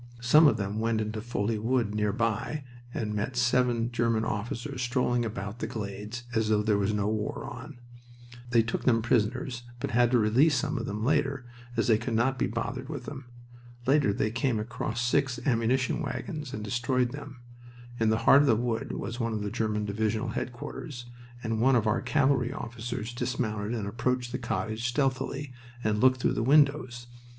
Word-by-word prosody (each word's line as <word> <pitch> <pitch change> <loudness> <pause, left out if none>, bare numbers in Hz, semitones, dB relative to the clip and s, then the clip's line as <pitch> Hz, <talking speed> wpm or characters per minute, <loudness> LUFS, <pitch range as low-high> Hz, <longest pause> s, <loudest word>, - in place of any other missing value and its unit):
Some 150 +7 +7
of - - +3
them 100 +1 -2
went 115 0 +1
into 110 0 -2
the - - -7
Folie 110 -2 -1
Wood 115 -1 +1
nearby 110 +6 -1 0.3
and 105 -3 -3
met 105 +4 -2
seven 120 -1 +2
German 115 -2 +1
officers 120 +5 -3
strolling 125 -1 +1
about 105 0 -5
the - - -2
glades, 105 +2 -5
as 110 -1 +1
though 105 -1 +3
no 105 -1 +1
war 110 +7 -2
was - - -5
on. 145 -5 -10 0.7
They 115 -2 +4
took 115 - -3
them 115 -3 +3
prisoners, 120 +2 0 0.2
but - - -3
had 120 0 +4
to 125 - +4
release 125 +8 +4
some 140 +1 -1
of 115 - -4
them 105 +2 -3
later, 140 -2 +1 0.3
as - - +2
they 110 -2 +4
could 115 0 -2
not 130 +3 +1
be - - +2
bothered 130 +4 -4
with 140 -6 -5
them. 140 -1 -7 0.6
Later 140 -5 +4
they 110 +1 0
came 120 0 0
across 115 +1 -3
six 125 0 +1
ammunition 125 0 +1
wagons 145 +2 -4
and 105 - -5
destroyed 120 +3 0
them. 140 -3 -9 0.6
In 110 -1 +3
the 110 - +3
heart 140 - +8
of 145 - +2
the 115 - +5
wood 115 0 -2
was 115 +2 -4
one 115 -1 -1
of 105 -1 -2
the 105 - -3
German 110 -2 -1
divisional 110 +3 -1
headquarters, 120 +3 -5 0.4
and 115 -1 -1
one 130 +2 +5
of 115 -2 +2
our 110 +2 +1
cavalry 135 -4 +2
officers 120 -1 -5
dismounted 115 -3 -2
and 110 -3 -3
approached 120 +3 -1
the 125 - -3
cottage 115 -1 -2
stealthily, 135 +1 -1 0.3
and 105 0 +1
looked 130 0 +5
through - - +2
the - - -1
windows. 135 -2 +3
120 Hz, 185 wpm, -28 LUFS, 110-130 Hz, 0.7 s, heart